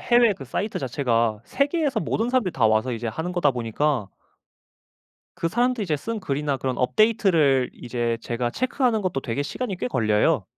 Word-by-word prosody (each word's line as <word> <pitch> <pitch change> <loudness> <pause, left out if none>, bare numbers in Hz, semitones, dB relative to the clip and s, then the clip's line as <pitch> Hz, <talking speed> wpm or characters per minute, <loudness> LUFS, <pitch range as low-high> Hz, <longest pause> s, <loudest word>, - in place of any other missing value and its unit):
해외 240 -2 +4
그 140 - -9
사이트 200 - -3
자체가 115 -5 0
세계에서 285 +1 0
모든 225 +7 -1
사람들이 245 -8 +1
다 120 -4 +3
와서 110 +3 +2
이제 115 0 -4
하는 160 +10 -3
거다 175 -6 +2
보니까 120 -1 -1 1.3
그 165 - -1
사람들이 240 +1 +1
이제 155 -4 0
쓴 225 +8 -4
글이나 145 -4 -1
그런 130 -1 -2
업데이트를 160 - +3
이제 120 -1 -2
제가 120 +1 -2
체크하는 250 - 0
것도 180 -8 -1
되게 130 +2 -2
시간이 195 - -4
꽤 125 - -2
걸려요. 110 -4 +2
145 Hz, 385 characters per minute, -24 LUFS, -, 1.3 s, 해외